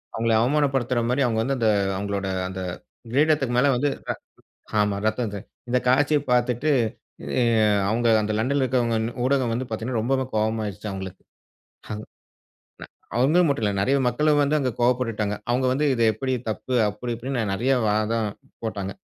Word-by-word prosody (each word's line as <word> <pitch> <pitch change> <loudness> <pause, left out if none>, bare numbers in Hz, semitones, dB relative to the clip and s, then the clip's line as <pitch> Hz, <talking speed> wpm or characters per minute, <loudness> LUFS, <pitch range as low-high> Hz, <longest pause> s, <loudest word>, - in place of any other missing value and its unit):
அவங்கள 115 0 +1
அவமானப்படுத்துற 135 -2 +1
மாரி 135 +3 +1
அவங்க 115 -2 0
வந்து 135 +3 0
அந்த 110 - +3 0.3
அவங்களோட 100 -1 -3 0.2
அந்த 95 0 -6 0.5
கிரீடத்துக்கு 140 -3 +2
மேல 135 +3 +4
வந்து 140 +4 +1 0.2
ர - - +2 0.7
ஆமா 105 -1 +1
ரத்தத்த 110 -2 -1 0.3
இந்த 125 - +2
காட்சிய 145 +4 +4
பார்த்துட்டு 125 +3 +1 0.7
எ - - +3 0.5
அவங்க 115 +3 0 0.2
அந்த 110 - -1
லண்டன்ல 135 +5 +1
இருக்கிறவங்க 120 -3 +1
இன் 115 - -2
ஊடகம் 130 -3 +1
வந்து 130 +2 -3
பார்த்தீங்கன்னா 115 +1 -2
ரொம்பவே 130 +2 +1
கோவமாயிடுச்சா 110 -1 -2
அவங்களுக்கு. 95 -1 -7 0.7
அங் 105 0 -4
ந - - -11 1.1
அவங்கள 145 +8 +4
மட்டும் 140 -6 0
இல்ல 105 - +1
நெறைய 135 +7 +2
மக்களும் 150 +5 +2
வந்து 145 +2 +2
அங்க 130 - 0
கோவப்பட்டுட்டுடாங்க. 115 -4 +1 0.2
அவங்க 130 +2 +1
வந்து 145 +3 0
இது 115 - 0
எப்படி 130 +5 -3 0.2
தப்பு 125 +4 -4
அப்படி 110 +4 -4
இப்படின்னு 125 +1 -3
நெறைய 125 +7 +1 0.2
வாதம் 110 +1 0 0.4
போட்டாங்க. 100 -3 -3
120 Hz, 155 wpm, -24 LUFS, 110-130 Hz, 1.1 s, மேல